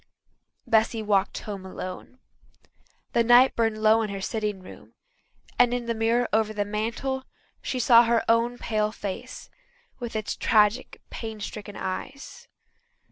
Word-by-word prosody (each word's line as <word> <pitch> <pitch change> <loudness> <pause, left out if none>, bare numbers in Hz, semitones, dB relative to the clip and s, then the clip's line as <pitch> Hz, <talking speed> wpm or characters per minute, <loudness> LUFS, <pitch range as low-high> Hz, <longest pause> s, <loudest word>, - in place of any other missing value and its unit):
Bessy 220 0 +2
walked 200 -2 +1
home 200 -3 -7
alone. 185 +5 -8 1.0
The 235 - +3
light 245 +3 +6
burned 225 -2 0
low 220 +1 +5
in 215 - -2
her 200 0 -5
sitting 210 -1 -3
room, - - -14 0.6
and 245 0 +4
in 245 -1 -4
the 235 - -1
mirror 230 +2 +1
over 215 0 +2
the 205 -1 -1
mantel 230 +6 -3 0.4
she 260 - -3
saw 235 -1 +6
her 230 0 +1
own 235 +1 +2
pale 215 -2 -1
face, 200 -3 -7 0.5
with 240 -3 -6
its 215 -1 -2
tragic, 215 +3 +2
pain 220 -2 -6
stricken 205 0 -7
eyes. 275 - -6
220 Hz, 140 wpm, -25 LUFS, 210-235 Hz, 1.0 s, light